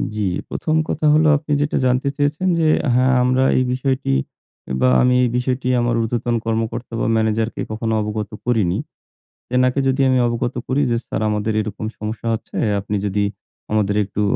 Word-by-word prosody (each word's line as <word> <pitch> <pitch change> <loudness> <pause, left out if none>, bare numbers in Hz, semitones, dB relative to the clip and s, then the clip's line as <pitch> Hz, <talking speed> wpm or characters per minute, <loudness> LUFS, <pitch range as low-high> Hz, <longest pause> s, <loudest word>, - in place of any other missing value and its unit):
জি 110 - -2 0.3
প্রথম 155 - -1
কথা 155 - -1
হলো 155 +1 +4
আপনি 150 +1 -8
যেটা 145 - 0
জানতে 125 +2 +1
চেয়েছেন 150 +6 0
যে 160 - +2 0.3
হ্যাঁ 130 +1 +3
আমরা 130 +1 +2
এই 130 - +3
বিষয়টি 130 - -1 0.7
বা 65 - +5
আমি 125 0 +3
এই 125 - +2
বিষয়টি 125 +1 -1
আমার 120 0 +1
উর্ধ্বতন 120 +1 -1
কর্মকর্তা 115 +1 -2
বা - - 0
ম্যানেজারকে 110 +1 0
কখনো 110 +1 -2
অবগত 105 0 -3 0.2
করিনি। 105 -7 +1 0.7
সেনাকে 125 +2 +2
যদি 135 +1 +1
আমি 130 - +3
অবগত 120 +1 -2
করি 135 +2 +1
যে 120 - +2
"স্যার - - -3
আমাদের 105 +1 -1
এরকম 110 0 -5
সমস্যা 110 +2 -5
হচ্ছে 110 - -6 0.2
আপনি 100 +1 -3
যদি 100 +1 0 0.5
আমাদের 105 -2 +1
একটু 100 +1 -4
120 Hz, 165 wpm, -20 LUFS, 110-130 Hz, 0.7 s, বা